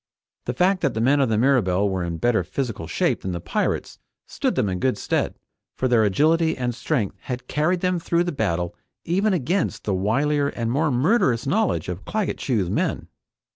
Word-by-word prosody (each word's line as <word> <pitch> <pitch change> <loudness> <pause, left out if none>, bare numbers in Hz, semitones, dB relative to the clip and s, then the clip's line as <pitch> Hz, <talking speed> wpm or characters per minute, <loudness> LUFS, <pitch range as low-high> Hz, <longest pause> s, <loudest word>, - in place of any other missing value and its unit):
The - - -3
fact 185 +1 +2
that 140 -7 0
the - - -1
men 135 +5 +3
of 135 -4 +2
the 110 - +1
Mirabelle 105 -7 +3
were 95 -2 -1
in 85 -1 -3
better 120 +6 +2
physical 115 -11 -4
shape - - 0
than 95 - -3
the 85 - -3
pirates - - -2 0.3
stood - - -2
them - - +1
in 90 -1 -2
good 130 +4 +1
stead, - - -1 0.4
for 130 - +1
their 120 -3 +4
agility 160 - +2
and 125 -1 -1
strength 120 -4 -2
had 125 -1 -6
carried 170 +4 0
them 180 -1 +1
through 170 +1 +1
the 175 - -2
battle 85 - -1 0.3
even 195 +5 +1
against 180 +2 -1
the 100 - -1
wilier 140 +10 +1
and 115 -1 -1
more 150 +5 +1
murderous 130 - +2
knowledge 205 +9 +1
of 90 +2 -5
Claggett 215 -4 -2
Chew's 110 -9 0
men. - - -1
130 Hz, 195 wpm, -23 LUFS, 105-165 Hz, 0.4 s, their